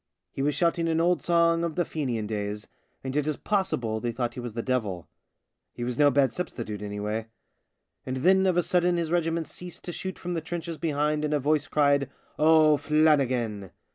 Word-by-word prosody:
He -, -, -5 dB
was 145 Hz, 0 st, +1 dB
shouting 170 Hz, +1 st, +1 dB
an 165 Hz, 0 st, +1 dB
old 175 Hz, +1 st, +2 dB
song 170 Hz, -1 st, +3 dB
of 165 Hz, -2 st, -2 dB
the 175 Hz, -, +1 dB
Fenian 125 Hz, -8 st, -2 dB
days, 105 Hz, 0 st, -4 dB, 0.4 s
and 130 Hz, 0 st, -4 dB
it 150 Hz, 0 st, 0 dB
is 155 Hz, -, -1 dB
possible 125 Hz, -, -1 dB
they 120 Hz, +1 st, -2 dB
thought 120 Hz, 0 st, -2 dB
he -, -, -7 dB
was 120 Hz, -2 st, -6 dB
the 115 Hz, 0 st, -3 dB
devil. 110 Hz, -9 st, -2 dB, 0.7 s
He 120 Hz, -, -5 dB
was 125 Hz, 0 st, -2 dB
no 145 Hz, -1 st, +6 dB
bad 135 Hz, -2 st, +2 dB
substitute 115 Hz, -, -5 dB
anyway. 105 Hz, +2 st, -3 dB, 0.8 s
And 130 Hz, 0 st, -4 dB
then 190 Hz, +7 st, +4 dB
of 180 Hz, -2 st, +2 dB
a 175 Hz, -, +3 dB
sudden 180 Hz, 0 st, +2 dB
his 165 Hz, -2 st, -2 dB
regiment 165 Hz, -1 st, 0 dB
ceased 175 Hz, +2 st, -9 dB
to 175 Hz, -, -4 dB
shoot 190 Hz, +2 st, -5 dB
from 180 Hz, 0 st, -4 dB
the 165 Hz, -, -2 dB
trenches 165 Hz, 0 st, -5 dB
behind 150 Hz, -1 st, 0 dB
and 150 Hz, 0 st, 0 dB
a -, -, +1 dB
voice 150 Hz, +2 st, +1 dB
cried, 140 Hz, -2 st, +2 dB, 0.2 s
" -, -, -28 dB
O'Flannigan.' 150 Hz, -, +3 dB
150 Hz, 200 wpm, -27 LUFS, 120-170 Hz, 0.8 s, no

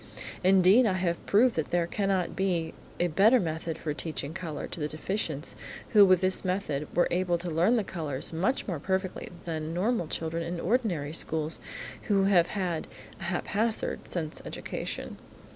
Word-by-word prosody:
Indeed, 190 Hz, +6 st, +6 dB
I 195 Hz, -, +2 dB
have 175 Hz, -2 st, -1 dB
proved 230 Hz, +4 st, +5 dB
that 160 Hz, -, -1 dB
there 175 Hz, -1 st, +2 dB
cannot 195 Hz, 0 st, -1 dB
be 175 Hz, -4 st, 0 dB, 0.3 s
a 175 Hz, -, +3 dB
better 200 Hz, +9 st, +5 dB
method 160 Hz, -2 st, -3 dB
for 150 Hz, -, -3 dB
teaching 155 Hz, -1 st, -4 dB
colour 165 Hz, -5 st, -5 dB
to -, -, -8 dB
the 150 Hz, -, -1 dB
deficients, 155 Hz, -1 st, -3 dB, 0.4 s
who, 210 Hz, -3 st, +7 dB
with 185 Hz, -1 st, +5 dB
this 185 Hz, 0 st, +4 dB
method 180 Hz, -6 st, -1 dB
were 175 Hz, -, +4 dB
able 175 Hz, -1 st, +1 dB
to 170 Hz, 0 st, -5 dB
learn 175 Hz, +9 st, +3 dB
the 225 Hz, -, +2 dB
colours 155 Hz, -7 st, -2 dB
much 190 Hz, +11 st, 0 dB
more 175 Hz, -7 st, -2 dB
perfectly 190 Hz, +3 st, -2 dB, 0.2 s
than 160 Hz, -1 st, -3 dB
normal 195 Hz, -1 st, 0 dB
children 165 Hz, +1 st, -3 dB
in 170 Hz, +1 st, -3 dB
the -, -, -5 dB
ordinary 180 Hz, -, 0 dB
schools 160 Hz, -1 st, -1 dB, 0.5 s
who 200 Hz, -3 st, +3 dB
have 185 Hz, -3 st, +4 dB
had 180 Hz, -5 st, -2 dB, 0.3 s
a 190 Hz, -, -6 dB
haphazard 210 Hz, +5 st, -1 dB
sense 160 Hz, -3 st, -4 dB
education. -, -, -5 dB
175 Hz, 170 wpm, -28 LUFS, 160-195 Hz, 0.5 s, who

